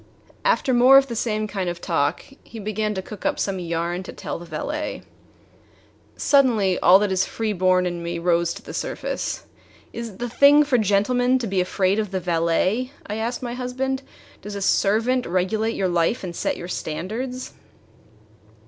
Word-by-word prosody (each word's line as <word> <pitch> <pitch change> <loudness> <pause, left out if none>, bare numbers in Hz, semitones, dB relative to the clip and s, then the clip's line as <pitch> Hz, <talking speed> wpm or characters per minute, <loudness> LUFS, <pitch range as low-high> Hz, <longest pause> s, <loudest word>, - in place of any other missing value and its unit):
After - - +2
more 250 +3 +7
of 275 - +5
the 235 - -4
same 215 -1 -1
kind 190 -4 -2
of 175 0 -5
talk, 155 -6 -1 0.2
he 230 - -12
began 215 0 -2
to 190 - -3
cook 205 0 -10
up - - 0
some 195 -2 -1
yarn 170 +1 -2
to 185 - -8
tell - - -6
the 175 - -11
valet. 300 - -4 1.1
Suddenly 230 -10 +3
all 180 +2 +7
that 205 0 0
is 190 0 +2
free 220 -2 -2
born 185 -1 +2
in 175 -1 -3
me 170 0 -3
rose 170 0 +1
to - - -11
the - - -9
surface. - - -3 0.5
"Is 235 0 -5
it 195 - -14
the 245 - -3
thing 280 +5 +6
for 275 -4 +2
gentlemen 245 +5 +2
to 250 - -3
be 190 -3 0
afraid 190 +2 +1
of 210 -2 -2
the 190 0 -2
valet?" 180 +8 0
I 210 - -4
asked 235 +3 -3
my 240 -1 -3
husband. 260 +2 -2 0.4
"Does 205 0 -7
a 200 - -4
servant 225 +7 +2
regulate 215 +6 0
your 190 - 0
life 175 +6 +1
and 175 -2 -5
set - - -1
your 175 - -7
standards?" 225 +11 -4
205 Hz, 185 wpm, -23 LUFS, 180-245 Hz, 1.1 s, more